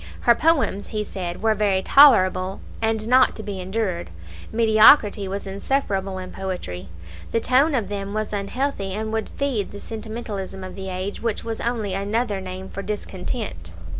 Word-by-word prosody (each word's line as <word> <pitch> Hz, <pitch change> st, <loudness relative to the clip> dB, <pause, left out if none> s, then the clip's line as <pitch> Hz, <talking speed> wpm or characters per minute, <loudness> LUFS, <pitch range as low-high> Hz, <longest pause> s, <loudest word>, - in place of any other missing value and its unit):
"Her 235 Hz, -, +6 dB
poems," 275 Hz, -8 st, +1 dB
he 215 Hz, -1 st, -2 dB
said, 180 Hz, -2 st, -5 dB
"were 220 Hz, -1 st, +4 dB
very 200 Hz, -3 st, +1 dB
tolerable, 190 Hz, -9 st, +5 dB, 0.2 s
and 220 Hz, -1 st, 0 dB
not 255 Hz, +1 st, +5 dB
to 220 Hz, -, -7 dB
be 200 Hz, -3 st, -5 dB
endured;" 190 Hz, -, -2 dB, 0.4 s
mediocrity 220 Hz, -2 st, +5 dB
was 200 Hz, +2 st, -4 dB
insufferable 195 Hz, -2 st, -1 dB
in 185 Hz, 0 st, -7 dB
poetry. 95 Hz, -, -5 dB, 0.4 s
The 230 Hz, -, +2 dB
tone 270 Hz, +6 st, +3 dB
of 225 Hz, -6 st, 0 dB
them 200 Hz, 0 st, -4 dB
was 215 Hz, 0 st, -2 dB
unhealthy, 200 Hz, 0 st, -2 dB
and 220 Hz, +1 st, -3 dB
would 220 Hz, -1 st, -2 dB
feed 265 Hz, -8 st, -2 dB
the 205 Hz, -, -8 dB
sentimentalism 215 Hz, -4 st, -6 dB
of 185 Hz, -1 st, -7 dB
the 190 Hz, -1 st, -6 dB
age, 185 Hz, +2 st, -4 dB
which 230 Hz, -3 st, -2 dB
was 225 Hz, -1 st, -4 dB
only 225 Hz, -5 st, -1 dB
another 205 Hz, +1 st, -1 dB
name 185 Hz, 0 st, -7 dB
for 200 Hz, -, -6 dB
discontent. 210 Hz, +2 st, -5 dB
205 Hz, 165 wpm, -23 LUFS, 190-225 Hz, 0.4 s, Her